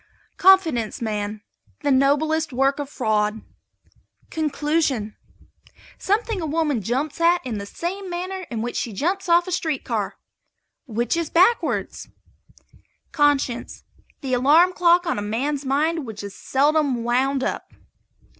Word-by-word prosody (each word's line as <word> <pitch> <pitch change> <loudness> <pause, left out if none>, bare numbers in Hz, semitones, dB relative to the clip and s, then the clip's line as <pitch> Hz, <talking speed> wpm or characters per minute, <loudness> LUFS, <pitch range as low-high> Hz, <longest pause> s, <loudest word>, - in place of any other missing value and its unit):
CONFIDENCE 330 - +4
MAN. 210 -2 -3 0.4
The 285 - +2
noblest 295 +4 +2
work 270 +3 +1
of 285 -1 -4
fraud. 215 -5 -1 0.9
CONCLUSION. 295 -7 -1 0.8
Something 420 0 0
a - - -2
woman 300 -5 0
jumps 270 - -2
at 345 -2 +3
in 225 -5 -3
the 200 - -7
same 375 - -5
manner 365 +1 -5
in 225 -2 -3
which 240 - -4
she 230 - -3
jumps 365 - -2
off 345 +1 +4
a - - -4
street 315 -5 -2
car - - -3 0.7
which 235 +2 -1
is 335 -2 -2
backwards. 375 +8 +1 1.0
CONSCIENCE. 285 -5 0 0.4
The 265 -3 -3
alarm 305 +9 +5
clock 350 0 +3
on 335 - -1
a - - -3
man's 270 +7 -2
mind 300 +2 0
which 215 -2 -7
is 200 -1 -7
seldom 280 -3 +1
wound 260 +3 +1
up. - - -4
290 Hz, 135 wpm, -22 LUFS, 240-335 Hz, 1.0 s, alarm